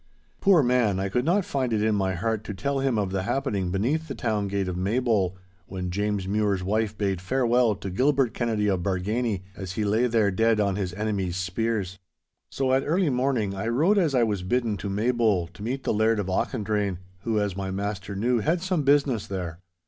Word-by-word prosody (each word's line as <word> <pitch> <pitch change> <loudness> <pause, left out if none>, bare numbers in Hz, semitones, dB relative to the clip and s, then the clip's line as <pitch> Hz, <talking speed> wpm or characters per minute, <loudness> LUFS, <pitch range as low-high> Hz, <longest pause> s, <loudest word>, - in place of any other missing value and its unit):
Poor 190 -7 +5
man—I 110 -6 +2
could 125 +6 0
not 180 +4 +2
find 130 -3 -1
it 105 -1 +1
in 110 0 +2
my 95 -2 0
heart 110 +3 -1
to 105 - -5
tell 140 +9 -1
him 135 -4 +1
of 100 -3 -1
the 95 -1 -1
happening 100 -4 -1
beneath 130 - 0
the 135 - -5
town 110 -3 -1
gate 100 -1 -1
of 90 - -3
Maybole, 100 -1 0 0.3
when 90 -1 -4
James 100 0 -1
Mure's 100 -2 0
wife 105 +2 -1
bade 95 -3 -1
farewell 120 +1 +2
to 95 - -6
Gilbert 130 +2 +2
Kennedy 110 -4 0
of 95 -3 +1
Bargany, 100 +2 -1
as 95 -2 -6
he 105 - -1
lay 110 +5 +2
there 110 -4 +2
dead 110 +3 +2
on 100 -2 +1
his 95 -3 -2
enemies' 100 -4 -2
spears. 95 0 -2 0.5
So 130 -1 0
at 135 - +4
early 165 0 +1
morning 125 -6 0
I 100 +3 -3
rode 160 - +3
as 160 -7 +1
I 125 - +4
was 105 -4 0
bidden 115 +3 0
to 100 - -5
Maybole 110 -3 +1
to 90 - -14
meet 130 +5 -3
the - - 0
Laird 110 +1 +2
of 100 - -1
Auchendrayne, 105 -3 -1 0.2
who, 110 +2 0
as 100 -3 -1
my 95 0 -3
master 100 0 -4
knew, 120 +4 +1
had 165 - 0
some 185 -4 0
business 140 -5 +2
there. 90 -4 -5
105 Hz, 205 wpm, -26 LUFS, 95-125 Hz, 0.5 s, Poor